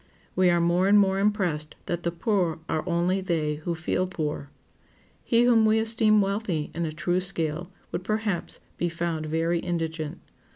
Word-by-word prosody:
We 185 -1 +4
are 175 0 +3
more 175 +2 +2
and 205 +1 +6
more 195 -1 +3
impressed 185 -7 0
that 175 0 -2
the 170 - -1
poor 175 -2 0
are 155 - -1
only 175 +3 +1
they 160 -5 -1
who 170 +3 -3
feel 170 +3 -1
poor. 150 -5 -4 0.7
He 235 0 +3
whom 235 -2 +5
we 220 0 +4
esteem 220 -1 +3
wealthy 195 -6 -1
in 170 +1 -2
a - - -3
true 175 +3 0
scale 175 -2 -2 0.2
would 175 - -3
perhaps 215 -3 -2 0.2
be 175 - 0
found 165 -2 -3
very 165 +2 0
indigent. 165 -2 -3
175 Hz, 170 wpm, -26 LUFS, 165-195 Hz, 0.7 s, and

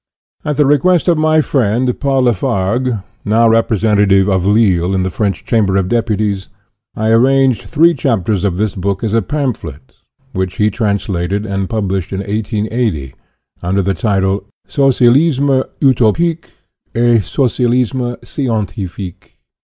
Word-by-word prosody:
At 150 -1 -2
the 150 - +4
request 155 +6 +2
of 170 -2 +3
my 155 0 +3
friend, 125 -2 0
Paul 135 -2 +1
Lafargue, 115 +1 0 0.2
now 115 +2 +3
representative 105 -3 +2
of 95 -2 +1
Lille 95 -4 +2
in 95 - 0
the 95 - -2
French 100 -1 -2
Cham 110 -4 +1
ber 95 0 +1
of 95 -1 0
Deputies, 105 -4 -1 0.5
I 110 +1 -1
arranged 130 +1 +3
three 165 +2 +4
chapters 110 - -1
of 95 -3 0
this 105 0 -1
book 100 +2 -3
as 110 -2 -1
a 115 - +3
pamphlet, 95 - -5 0.4
which 95 -2 -2
he 105 +2 +1
translated 100 -2 -2
and 95 -2 -3
pub 110 -4 -2
lished 95 -3 -3
in 95 0 -3
1880, 105 - -2 0.5
under 95 +3 0
the 95 +1 0
title: 95 -2 0 0.2
"Socialisme 135 +1 +3 0.2
utopique 145 +5 +1 0.5
et 120 0 +3
Socialisme 125 +1 0
scientifique." 100 - -5
110 Hz, 140 wpm, -15 LUFS, 95-130 Hz, 0.5 s, the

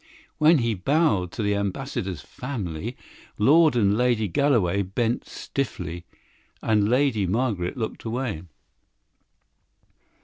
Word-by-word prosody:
When 155 +2 +6
he 115 -3 +1
bowed 105 - +1
to 110 - -3
the 100 0 +1
Ambassador's 100 - -3
family, 115 - -5 0.4
Lord 150 +6 +5
and 100 -4 +3
Lady 120 -2 +2
Galloway 100 - +2
bent 115 +5 -1
stiffly, 90 -10 -4 0.5
and 105 -2 +2
Lady 125 -6 +2
Margaret 105 -2 -1
looked 110 -2 -4
away. 115 -7 -3
110 Hz, 105 wpm, -25 LUFS, 95-130 Hz, 0.5 s, When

